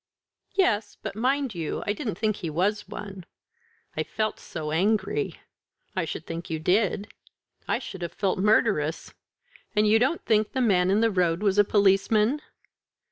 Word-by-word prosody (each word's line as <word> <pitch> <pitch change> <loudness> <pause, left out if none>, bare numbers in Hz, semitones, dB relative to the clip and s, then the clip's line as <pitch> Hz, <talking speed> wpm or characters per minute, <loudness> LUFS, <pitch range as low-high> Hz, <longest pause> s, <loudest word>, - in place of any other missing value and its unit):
"Yes; 215 - +1
but, 215 -3 -6
mind 260 +3 0
you, 165 -4 -3
I 205 - +1
didn't 215 - -4
think 215 -1 0
he 165 - -4
was 195 +7 0
one. 195 -3 -8 0.7
I - - 0
felt 215 -1 -2
so 155 -2 -5
angry." 205 - 0 0.6
"I 185 -3 0
should 160 +1 -6
think 170 +2 -6
you 160 - -1
did. 200 +5 +1 0.6
I - - +1
should 185 - -8
have 170 - -4
felt 195 -2 -1
murderous. 195 -6 +2 0.6
And 210 0 +4
you 220 +1 +5
don't 265 +8 0
think 215 -1 +2
the 265 - -1
man 190 -7 +3
in 200 +3 +3
the 230 -1 +3
road 180 -1 +1
was 200 -1 +3
a - - +8
policeman?" 210 +6 +3
205 Hz, 165 wpm, -26 LUFS, 180-220 Hz, 0.7 s, a